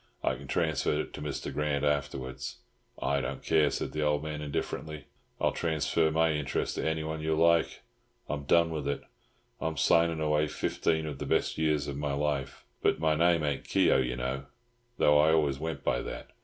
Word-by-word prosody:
I - - +2
can 65 +2 -9
transfer 80 -1 +1
it - - -9
to - - -7
Mr. 75 -2 -4
Grant 75 -1 0
afterwards." 70 -2 -2 0.4
"I 70 0 +1
don't - - -5
care," 75 -2 +3
said - - -3
the 75 - -3
old 75 0 +1
man 75 -1 -4
indifferently, 75 +1 -4 0.3
"I'll - - +2
transfer 80 0 +1
my 80 +1 +2
interest 75 -3 -1
to - - -1
anyone 80 0 -3
you 80 0 0
like. 85 +1 +3 0.5
I'm 70 0 -4
done 85 +3 +4
with 75 -3 -3
it. 70 - -2 0.6
I'm 80 -1 -2
signing 85 +4 +3
away 75 0 +2
fifteen 80 +1 -1
of 75 -3 -5
the - - -4
best - - +1
years 75 -2 +1
of 70 -1 -4
my 70 -1 -2
life. 70 -2 -2 0.2
But - - +2
my 80 -1 +2
name 85 0 +3
ain't 70 -2 -1
Keogh, - - +3
you 60 -1 -1
know, 65 +2 -3 0.5
though 75 0 +5
I 80 +1 +5
always 75 -4 +2
went 80 +1 -4
by - - +1
that. - - -7
75 Hz, 190 wpm, -30 LUFS, 70-80 Hz, 0.6 s, though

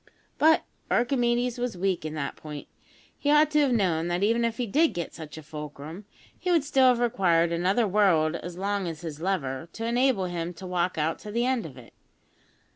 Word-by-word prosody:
But 320 +1 +5 0.3
Archimedes 245 -1 +1
was 245 -6 -2
weak 185 -2 0
in 155 0 -4
that 140 -2 -3
point. 150 -2 -9 0.5
He 290 - -1
ought 300 +1 +5
to 300 - +3
have 285 -3 +3
known 175 -8 +1
that, 175 +2 -1
even 230 +3 +2
if 230 -1 -1
he 245 - -1
did 300 +10 +2
get 170 -1 -4
such 160 -1 -9
a 155 - -9
fulcrum, 150 +4 -8 0.3
he 365 - -3
would 335 -5 +3
still 270 -3 +4
have 250 -1 +5
required 180 -8 +2
another 190 +7 +1
world 180 -6 +3
as 175 +1 -8
long 200 0 -1
as 160 -2 -6
his 160 -3 -7
lever, 160 -5 -2
to 225 - -5
enable 240 -4 +2
him 175 -1 -4
to 190 - -9
walk 180 -1 -1
out 160 +1 0
to 210 - -8
the 235 +3 0
end 255 -7 0
of 135 -4 -13
it. 120 -2 -14
190 Hz, 205 wpm, -27 LUFS, 165-240 Hz, 0.5 s, But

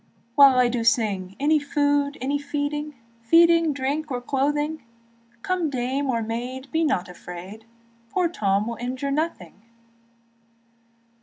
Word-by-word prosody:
While 275 -1 +7
I 250 -1 +5
do 240 -1 -1
sing, 200 -5 +1
Any 300 +2 +3
food, 285 0 0
any 280 +2 -1
feeding, 295 +1 -3 0.3
Feeding, 335 +5 +5
drink, 285 +3 -2
or 250 -2 -2
clothing; 295 +4 -1 0.6
Come 360 -4 0
dame 265 +2 -2
or 230 -3 0
maid, 250 +4 -5
be 325 +1 +1
not 265 - 0
afraid, 180 +4 -10 0.4
Poor 360 +7 +1
Tom 205 - 0
will 235 0 -4
injure 255 +3 -3
nothing. 280 - -3
275 Hz, 130 wpm, -24 LUFS, 230-295 Hz, 0.6 s, While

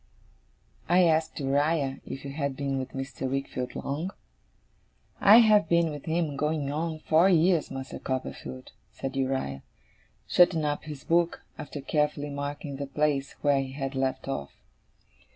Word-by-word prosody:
I 180 +1 +6
asked 160 -2 +2
Uriah 140 0 +1
if 135 - -6
he 140 - -6
had 140 -2 -3
been 140 -1 -1
with 130 0 -6
Mr. 135 -1 -4
Wickfield 135 -2 -3
long? 155 +7 -3 1.1
'I 210 +3 +8
have 215 -2 +4
been 170 -1 +3
with 145 -2 -8
him, 160 -3 0
going 150 -1 -1
on 160 +2 -2
four 160 +4 +4
year, 175 -1 +4
Master 135 0 -6
Copperfield,' 65 - -5 0.2
said 135 0 -5
Uriah; 130 - -1 0.7
shutting 170 -3 +4
up 145 0 -2
his 150 -3 -8
book, 170 0 +1
after 145 -1 -7
carefully 150 0 0
marking 140 0 -5
the 140 0 -4
place 140 -1 0
where 140 -2 +3
he 130 -1 -6
had 135 0 -4
left 135 0 -1
off. 105 - -4
145 Hz, 150 wpm, -28 LUFS, 135-160 Hz, 1.1 s, I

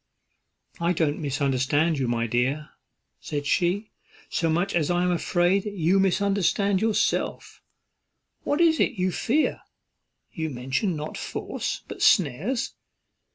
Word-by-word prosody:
"I 170 +1 +1
don't 155 -3 0
misunderstand 140 +2 +1
you, 130 - 0
my 115 -1 0
dear," 130 +6 -1 0.5
said 145 -1 -4
she, 180 +8 0 0.4
"so 165 - 0
much 175 +5 0
as 160 -4 +1
I 175 0 +2
am 180 - +2
afraid 175 +2 +2
you 195 -2 +1
misunderstand 195 0 +2
yourself. 220 -1 -1 0.8
What 290 - -1
is 330 -2 +4
it - - +2
you 185 -2 0
fear? 280 - 0 0.7
you 160 -1 -3
mention 130 - -2
not 150 0 -5
force, - - -4
but - - -8
snares. 195 - +2
175 Hz, 125 wpm, -25 LUFS, 145-195 Hz, 0.8 s, is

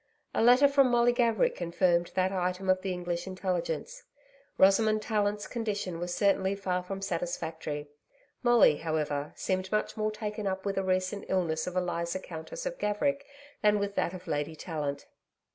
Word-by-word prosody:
A - - +1
letter 250 +5 +7
from 275 -2 +4
Molly 240 0 +4
Gaverick 235 -4 +2
confirmed 175 0 +1
that 185 0 +2
item 185 0 0
of 185 0 +1
the 190 - -2
English 175 0 -3
Intelligence. 185 -4 -3 0.6
Rosamond 215 +3 +4
Tallant's 210 -1 0
condition 205 -7 -3
was 175 0 -3
certainly 195 0 +2
far 185 -2 -1
from 195 +2 -6
satisfactory. 160 -4 -3 0.5
Molly, 240 - +5
however, 150 -2 -2
seemed 185 0 -2
much 215 0 0
more 215 0 0
taken 210 -1 -4
up 190 0 -3
with 195 -1 0
a - - -1
recent 185 +1 -1
illness 165 -4 0
of 180 - -4
Eliza 170 -1 -1
Countess 175 - -7
of - - -4
Gaverick 280 +7 0 0.4
than 210 0 +4
with 200 0 -2
that 180 -2 -1
of 180 0 -10
Lady 145 +2 -2
Tallant. 150 -4 -4
190 Hz, 160 wpm, -29 LUFS, 175-210 Hz, 0.6 s, letter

